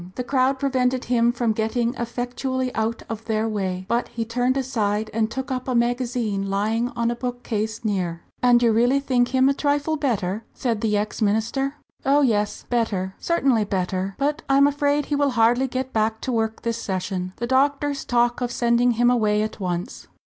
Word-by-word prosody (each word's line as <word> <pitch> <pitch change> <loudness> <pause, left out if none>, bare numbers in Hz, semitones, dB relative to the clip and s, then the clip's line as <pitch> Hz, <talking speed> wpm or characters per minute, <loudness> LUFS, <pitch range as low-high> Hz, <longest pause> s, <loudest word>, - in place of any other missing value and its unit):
The 250 - -3
crowd 265 +1 +1
prevented 260 -2 0
him 235 -1 +3
from 240 -2 0
getting 230 +2 0
effectually 250 +1 -3
out 225 +1 -2
of 225 0 -6
their 220 0 0
way, 190 -4 -2
but 235 +2 0
he 230 -1 -4
turned 245 +3 0
aside 215 -5 -1
and 220 0 +1
took 265 +2 -5
up 255 0 -3
a 255 - 0
magazine 235 -4 0
lying 220 +4 0
on 235 0 +1
a - - -2
bookcase 230 -3 -3
near. 180 -5 -1 0.2
"And 245 -1 +5
you 230 - +5
really 245 +5 +3
think 255 -3 +1
him 260 +1 +3
a 275 - +4
trifle 290 +2 0
better?" 215 -7 -1
said 230 -5 -1
the 210 -2 +1
ex 210 +3 -3
minister. 225 +7 0 0.3
"Oh, 280 +2 +4
yes, 210 -5 0
better 200 -6 -1
certainly 270 -10 +2
better 190 -1 -2
but 290 +2 0
I 275 - +4
am 280 - +6
afraid 285 0 +1
he 295 - -1
will 285 0 +2
hardly 240 +4 +4
get 260 +1 -4
back 220 0 +1
to 260 - -2
work 225 -2 -1
this 230 0 -2
session 185 -1 -3
the 235 - -3
doctors 275 +2 +1
talk 240 0 +1
of 245 -1 -1
sending 240 0 +2
him 240 +2 +3
away 215 -3 +2
at 215 - -5
once." 180 -2 -4
235 Hz, 190 wpm, -23 LUFS, 215-260 Hz, 0.3 s, am